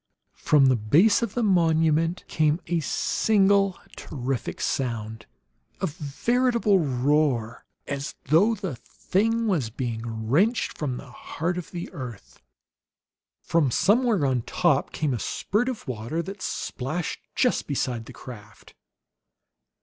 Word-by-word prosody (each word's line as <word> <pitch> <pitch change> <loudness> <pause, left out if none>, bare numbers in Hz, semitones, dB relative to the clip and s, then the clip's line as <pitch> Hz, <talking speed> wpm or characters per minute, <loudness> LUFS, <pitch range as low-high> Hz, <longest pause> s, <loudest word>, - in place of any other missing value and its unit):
From 145 -3 +4
the 130 -1 +5
base 150 - +4
of 230 -4 -3
the 240 - +1
monument 165 -3 +2
came 155 +1 +1
a 170 0 0
single 195 +3 +2 0.2
terrific 130 -2 -4
sound, 110 -4 -3 0.5
a 190 - 0
veritable 210 - +1
roar, 135 -4 0 0.2
as 140 0 -4
though 185 - +4
the 190 - -4
thing 225 - -1
was 165 - 0
being 115 -2 -4
wrenched 200 - +2
from 135 -5 -3
the 130 -1 -11
heart 165 +7 -3
of 175 - -8
the 175 -1 -5
earth. 125 -6 -9 1.0
From 160 -5 +2
somewhere 210 - +3
on 130 -3 +1
top 155 +2 +1
came 150 -4 -1
a 120 - -2
spurt 220 - -1
of 255 - -6
water 125 +7 -3
that 195 +2 -8
splashed 155 +7 -3 0.2
just 250 -2 +1
beside 125 -5 -2
the - - -9
craft. 105 -4 -12
155 Hz, 125 wpm, -25 LUFS, 125-195 Hz, 1.0 s, the